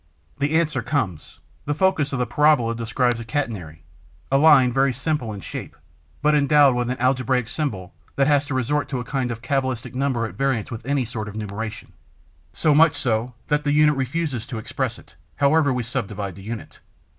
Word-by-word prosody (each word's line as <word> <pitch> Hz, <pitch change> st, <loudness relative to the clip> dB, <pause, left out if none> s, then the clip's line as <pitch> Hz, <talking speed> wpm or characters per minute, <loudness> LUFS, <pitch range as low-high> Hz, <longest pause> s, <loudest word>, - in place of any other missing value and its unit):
The 145 Hz, +3 st, +2 dB
answer 160 Hz, -2 st, 0 dB
comes: 95 Hz, -, -3 dB, 0.3 s
The 145 Hz, -, -1 dB
focus 155 Hz, -5 st, +2 dB
of 135 Hz, -, -1 dB
the 125 Hz, -, 0 dB
parabola 130 Hz, -2 st, +3 dB
describes 115 Hz, +1 st, 0 dB
a -, -, -5 dB
'catenary,' 105 Hz, -, -4 dB, 0.5 s
a 135 Hz, -, +4 dB
line 140 Hz, -5 st, +6 dB
very 135 Hz, 0 st, +2 dB
simple 145 Hz, -6 st, -2 dB
in 100 Hz, -2 st, -7 dB
shape, -, -, -7 dB, 0.5 s
but 150 Hz, 0 st, +4 dB
endowed 145 Hz, -2 st, +5 dB
with 120 Hz, 0 st, -1 dB
an 125 Hz, -, -2 dB
algebraic 130 Hz, -1 st, +1 dB
symbol 105 Hz, -, -3 dB, 0.2 s
that 135 Hz, -, +3 dB
has 145 Hz, 0 st, +3 dB
to 145 Hz, -, -4 dB
resort 145 Hz, +4 st, 0 dB
to 130 Hz, -, -2 dB
a -, -, -4 dB
kind 130 Hz, 0 st, -2 dB
of 115 Hz, 0 st, -6 dB
cabalistic 130 Hz, -3 st, -2 dB
number 130 Hz, -3 st, 0 dB
at 110 Hz, -, -6 dB
variance 135 Hz, -6 st, -1 dB
with 115 Hz, -1 st, -6 dB
any 140 Hz, -2 st, +1 dB
sort 110 Hz, -1 st, -5 dB
of 105 Hz, -, -8 dB
numeration, 110 Hz, -1 st, -6 dB, 0.6 s
so 150 Hz, -, +2 dB
much 155 Hz, +1 st, +5 dB
so 120 Hz, 0 st, -1 dB
that 150 Hz, 0 st, +1 dB
the 145 Hz, -, +1 dB
unit 150 Hz, 0 st, +4 dB
refuses 135 Hz, -2 st, -2 dB
to 120 Hz, -, -5 dB
express 110 Hz, -, -3 dB
it, -, -, -18 dB, 0.2 s
however 145 Hz, +1 st, +3 dB
much 130 Hz, -, 0 dB
we 125 Hz, -, -1 dB
subdivide 100 Hz, -4 st, -4 dB
the 95 Hz, -, -12 dB
unit. 110 Hz, +2 st, -7 dB
130 Hz, 195 wpm, -23 LUFS, 115-145 Hz, 0.6 s, line